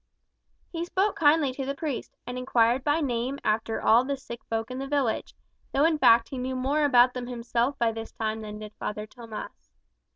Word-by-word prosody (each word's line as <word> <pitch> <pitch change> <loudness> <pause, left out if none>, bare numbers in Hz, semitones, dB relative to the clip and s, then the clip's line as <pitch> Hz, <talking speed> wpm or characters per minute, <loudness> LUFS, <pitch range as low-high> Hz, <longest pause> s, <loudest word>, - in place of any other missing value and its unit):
He 335 -1 -3
spoke 385 +4 0
kindly 295 -2 +4
to 270 - -4
the 275 +1 -3
priest, 290 -3 -5
and 245 - -5
inquired 250 0 +2
by 295 +3 +2
name 255 0 -1
after 220 +1 0
all 230 +3 +5
the 280 +1 -2
sick 235 -3 -9
folk 225 +1 -3
in 255 - -4
the 270 - -4
village, 275 -5 -1 0.4
though 280 +3 +4
in 320 -2 +2
fact 230 -3 +5
he 265 - -5
knew 260 +1 -3
more 275 +4 +1
about 250 -2 +5
them 250 -1 -5
himself 240 +2 -1
by 230 -1 +2
this 225 0 -7
time 220 0 -3
than 210 -1 -7
did 215 0 -9
Father 210 0 -4
Tomas. 225 -1 -9
250 Hz, 200 wpm, -27 LUFS, 230-280 Hz, 0.4 s, all